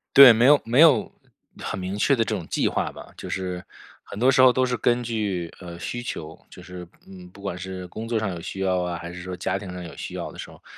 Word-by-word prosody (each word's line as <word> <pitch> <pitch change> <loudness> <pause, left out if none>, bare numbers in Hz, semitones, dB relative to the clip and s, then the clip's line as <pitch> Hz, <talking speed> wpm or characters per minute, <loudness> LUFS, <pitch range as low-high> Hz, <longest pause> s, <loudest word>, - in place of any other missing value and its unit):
对， 140 -3 +12
没 115 +2 +3
有 145 +1 +6
没 120 +4 +1
有 160 -4 +6 0.5
很 - - -4
明 95 +2 -4
确 135 +6 +3
的 115 - +2
这 110 - -3
种 95 -6 -4
计 - - 0
划 - - -1
吧， - - -12
就 - - -8
是 90 -1 -3 0.4
很 - - -10
多 125 +5 +4
时 130 - +4
候 130 -1 +7
都 130 0 +2
是 125 -1 -1
根 120 0 +1
据， 100 -7 -3
呃， 85 -2 -9
需 120 +7 -5
求， 80 -9 -7
就 90 - -13
是， 90 -2 -9 0.2
嗯， 90 -2 -12
不 100 - -15
管 100 -3 -4
是 95 0 -6
工 110 +5 -7
作 115 -1 0
上 110 -2 -1
有 90 -2 -5
需 95 +3 -6
要 95 -1 +1
啊， 90 -1 -3
还 85 0 -8
是 90 0 -8
说 90 0 -6
家 95 +2 -2
庭 95 -2 -8
上 90 0 -7
有 85 - -9
需 - - -6
要 - - -5
的 - - -13
时 - - -7
候， - - -17
95 Hz, 290 characters per minute, -24 LUFS, 90-120 Hz, 0.5 s, 对